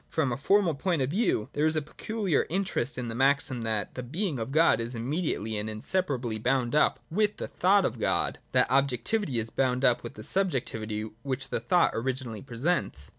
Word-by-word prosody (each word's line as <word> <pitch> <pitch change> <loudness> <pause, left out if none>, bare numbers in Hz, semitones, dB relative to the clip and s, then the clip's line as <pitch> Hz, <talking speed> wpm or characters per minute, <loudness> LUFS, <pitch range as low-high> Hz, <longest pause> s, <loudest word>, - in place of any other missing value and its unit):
From 145 -5 0
a - - 0
formal 175 +5 +3
point 160 0 0
of 130 - -2
view, 180 - +1
there 150 +2 +2
is 160 - +3
a 155 - +1
peculiar 200 +1 -1
interest 180 -8 -1
in 125 -1 -3
the 115 - -4
maxim 135 0 +2
that 110 -2 -2
the 125 - -5
being 155 - -2
of 115 +4 -4
God 155 -6 +4
is 120 +2 -4
immediately 115 - -2
and 105 +1 -4
inseparably 120 - -2
bound 125 +1 0
up 150 - +3
with 210 +4 +1
the - - -4
thought 195 +1 +3
of - - -2
God, - - 0
that - - +3
objectivity 135 - +1
is 115 0 -1
bound 130 0 +1
up 120 - +4
with - - -8
the - - -9
subjectivity 115 - -1 0.2
which 135 0 -3
the - - -1
thought 180 -2 +3
originally 125 -2 -3
pre 125 -4 -10
sents. 130 - -1
135 Hz, 200 wpm, -28 LUFS, 120-170 Hz, 0.2 s, God